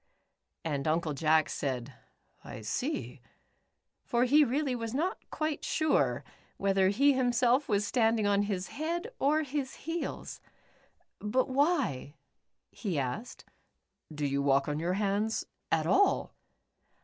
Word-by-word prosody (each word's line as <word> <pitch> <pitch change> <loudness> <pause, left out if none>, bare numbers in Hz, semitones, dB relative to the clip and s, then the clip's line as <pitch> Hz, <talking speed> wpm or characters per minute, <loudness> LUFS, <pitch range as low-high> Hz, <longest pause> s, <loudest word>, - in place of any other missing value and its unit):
And 145 -2 -2
Uncle 160 0 +1
Jack 155 +2 +3
said, 130 -1 -3 0.3
" - - -38
I 110 - -8
see," 255 - -3 0.8
for 240 0 +1
he 290 +4 +6
really 275 0 0
was 230 0 -4
not 355 +8 -1
quite 310 -1 -2
sure, 315 -1 +1 0.3
whether 195 -1 +3
he 275 +8 +4
himself 250 +1 +2
was 205 -1 +2
stand 225 0 +2
ing 210 - 0
on 200 0 +3
his 200 -3 -2
head 340 - -3
or 305 +3 +3
his 275 -2 -3
heels. 330 +1 -4 0.8
"But 240 +6 0
why," 265 - +1 0.6
he 190 -8 -3
asked, 140 - -4 0.4
" 155 - -18
do 145 - 0
you 140 0 0
walk 140 0 +3
on 150 0 -1
your 175 +3 0
hands 205 +2 0 0.3
at - - +2
all 405 - +3
220 Hz, 135 wpm, -30 LUFS, -, 0.8 s, he